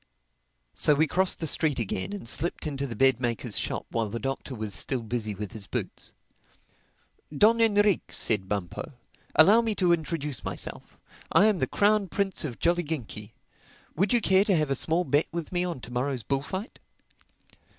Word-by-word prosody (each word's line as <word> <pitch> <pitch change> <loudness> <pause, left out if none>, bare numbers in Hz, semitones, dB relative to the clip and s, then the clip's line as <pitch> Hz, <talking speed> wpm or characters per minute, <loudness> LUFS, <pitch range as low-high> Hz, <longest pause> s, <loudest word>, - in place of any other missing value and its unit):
So 150 - +3
we 155 +3 +3
crossed 185 +4 +1
the 165 - -4
street 155 -2 +1
again 100 - -2
and 200 -12 -6
slipped 165 +9 -2
into 140 -2 -3
the 115 - -6
bed 130 +1 +3
maker's 120 -3 -1
shop - - -3
while 115 -2 -1
the 115 - -4
Doctor 135 +1 -4
was 110 -3 -5
still 115 - 0
busy 110 -2 -3
with 105 0 -6
his 110 -4 -6
boots. - - -5 1.2
"Don 220 +10 +4
Enrique," 205 -3 +4
said 100 -4 -1
Bumpo, 100 - -4 0.4
"allow 205 +8 +7
me 225 -2 -1
to 180 -3 +3
introduce 150 -5 -2
myself. - - -5 0.3
I 200 - +5
am 210 -4 +3
the - - +1
Crown 205 -1 +2
Prince 195 0 -2
of 130 -7 -5
Jolliginki. 155 -11 -2 0.6
Would 190 +5 +1
you 240 - +4
care 190 -1 +4
to 205 -2 +2
have 155 -3 +1
a - - +2
small 165 +6 +1
bet 145 0 +1
with 170 -1 -5
me 175 -1 0
on 175 -6 -3
to 120 - -9
morrow's 125 -1 -1
bullfight?" 145 - -3
150 Hz, 175 wpm, -27 LUFS, 120-185 Hz, 1.2 s, allow